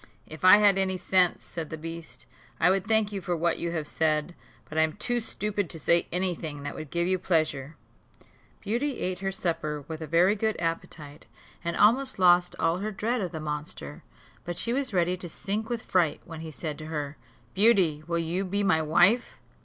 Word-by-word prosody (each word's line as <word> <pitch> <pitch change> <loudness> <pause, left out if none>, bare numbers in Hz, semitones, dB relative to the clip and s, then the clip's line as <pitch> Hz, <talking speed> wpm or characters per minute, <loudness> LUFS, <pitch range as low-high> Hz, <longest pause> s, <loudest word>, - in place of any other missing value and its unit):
"If 155 +1 -11
I 185 +2 +9
had 205 -2 +4
any 190 -1 +1
sense," 180 0 +3
said 165 -3 -6
the 155 - -6
beast, 165 +1 -8 0.3
"I 180 - +5
would 195 +1 0
thank 220 -2 +3
you 200 -1 -4
for 175 -2 -2
what 170 +1 +1
you 170 - -1
have 160 -3 -2
said; 155 +2 0 0.3
but 155 - -10
I 160 - +3
am 160 0 +1
too 245 +3 -1
stupid 210 -4 -3
to 165 - -3
say 170 +3 +3
any 180 +1 +2
thing 150 -3 -6
that 145 - -4
would 155 - -8
give 170 +2 0
you 185 +1 +1
pleasure." 155 -5 0 0.9
Beauty 250 +6 -1
ate 180 -1 -2
her 195 0 -2
supper 155 -6 -3
with 160 -1 -6
a 160 - -5
very 175 +6 +4
good 220 +1 -1
appetite, 165 -3 -5 0.4
and 170 0 -2
almost 255 +5 +3
lost 180 -1 +4
all 165 +2 +1
her 210 +2 -2
dread 225 +4 -1
of 185 - -3
the 160 - -5
monster; 150 - -6 0.4
but 175 -1 -5
she 235 - 0
was 270 -1 -1
ready 180 -1 +1
to 175 -1 -6
sink 210 +6 -3
with 240 -2 -3
fright, 175 -5 +1
when 165 -2 -9
he 160 0 -7
said 155 0 -6
to 155 - -8
her, 150 -2 -4 0.4
"Beauty, 190 -8 +3
will 170 0 0
you 170 +3 -1
be 200 +2 -1
my 180 -5 +3
wife?" 175 +10 +3
175 Hz, 210 wpm, -27 LUFS, 160-195 Hz, 0.9 s, I